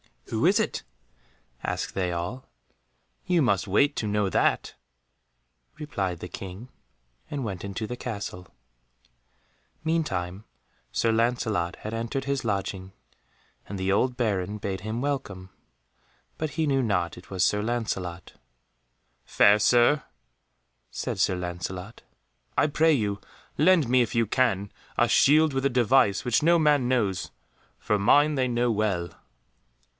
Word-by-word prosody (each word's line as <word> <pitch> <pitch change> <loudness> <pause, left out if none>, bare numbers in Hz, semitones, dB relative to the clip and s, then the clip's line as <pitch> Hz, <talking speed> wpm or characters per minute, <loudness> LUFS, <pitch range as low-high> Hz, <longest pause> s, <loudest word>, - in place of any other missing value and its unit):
"Who - - 0
is - - +4
that?" - - -1 0.8
asked - - -3
they 90 -2 -1
all. 90 +10 -5 0.8
"You 180 -2 +2
must 100 -7 +1
wait 140 +10 +3
to 110 - -1
know 105 -1 +1
that," - - +1 1.0
replied 95 - -3
the 90 - -6
King, 95 +6 -8 0.6
and 145 -2 -3
went 100 -4 -5
into 100 +3 -4
the 125 +3 -6
castle. 100 -7 -6 1.4
Meantime 105 - -2 0.5
Sir 115 - +1
Lancelot 110 -6 0
had 110 - -5
entered 115 +4 -3
his 140 -2 -2
lodging, 95 -2 -3 0.7
and 100 - -5
the 95 +1 0
old 125 +5 +1
Baron 105 -4 -1
bade 95 -2 -4
him 110 +4 -4
welcome, 130 -10 -3 0.9
but 155 -1 -3
he 160 0 -1
knew 135 -2 +2
not 95 -8 -1
it 90 - -14
was 95 -2 +1
Sir 105 - +1
Lancelot. 105 -7 -3 0.9
"Fair 100 +1 +5
Sir," 120 +7 +4 0.9
said - - -4
Sir 95 - +2
Lancelot, 90 +4 -6 0.6
"I - - +4
pray 160 +2 +3
you 105 -6 -1 0.4
lend 160 -3 +4
me, 125 0 +5
if 120 +1 -1
you 115 0 +3
can, 105 -4 0 0.3
a - - +3
shield 155 +1 +5
with 135 0 -1
a - - +4
device 125 -4 +3
which 120 -2 +2
no 170 +3 +5
man 150 -5 +3
knows, 105 -8 0 0.5
for 105 - 0
mine 145 +9 +4
they 130 -2 +1
know 120 0 +1
well." 100 -5 0
110 Hz, 140 wpm, -26 LUFS, 95-130 Hz, 1.4 s, Fair